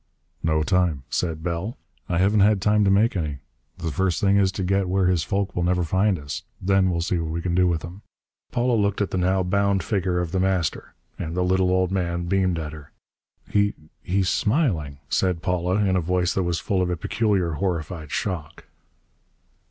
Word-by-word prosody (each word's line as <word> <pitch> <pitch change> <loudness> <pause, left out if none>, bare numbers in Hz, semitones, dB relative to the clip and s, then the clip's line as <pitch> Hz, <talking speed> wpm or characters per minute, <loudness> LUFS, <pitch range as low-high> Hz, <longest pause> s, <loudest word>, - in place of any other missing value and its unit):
"No 80 -1 +1
time," 90 -6 +1
said 80 -3 -2
Bell. 90 +7 -3 0.3
"I 85 - 0
haven't 100 +4 +3
had 100 0 +4
time 105 +2 +3
to - - +3
make 105 +3 +3
any. 75 -6 -2 0.4
The 80 - -3
first 90 +4 0
thing 100 0 +3
is 95 -2 +3
to 95 - -3
get 95 0 +1
where 95 0 +2
his 90 -2 +2
folk 100 +3 -2
will 90 - 0
never 90 0 +1
find 95 +3 +2
us. 70 -2 -6 0.2
Then 95 0 +2
we'll 85 -2 -1
see 85 +1 0
what 80 -1 -3
we 80 +1 -2
can 85 0 -2
do 90 +1 +4
with 85 -3 -1
him." 90 +4 -9 0.5
Paula 120 0 +1
looked 100 -1 0
at 100 - -1
the 95 - 0
now 95 +1 +2
bound 100 +1 +1
figure 95 -4 0
of 85 -2 -2
The 95 - 0
Master. 95 -4 -1 0.2
And 80 +2 -4
the 90 - +2
little 95 0 +2
old 95 0 +2
man 85 -2 -1
beamed 95 -1 +1
at 80 -1 -5
her. 75 -2 -12 0.5
"He 100 0 +1 0.3
he's 95 +1 0
smiling!" 100 - 0
said 90 -3 0
Paula, 90 0 0
in 100 -2 +2
a 90 - +2
voice 90 +1 0
that 95 - 0
was 85 -2 0
full 95 -2 0
of 90 - 0
a 90 - -1
peculiar 100 -3 0
horrified 80 -2 -3
shock. 85 -7 -4
90 Hz, 205 wpm, -24 LUFS, 85-95 Hz, 0.5 s, had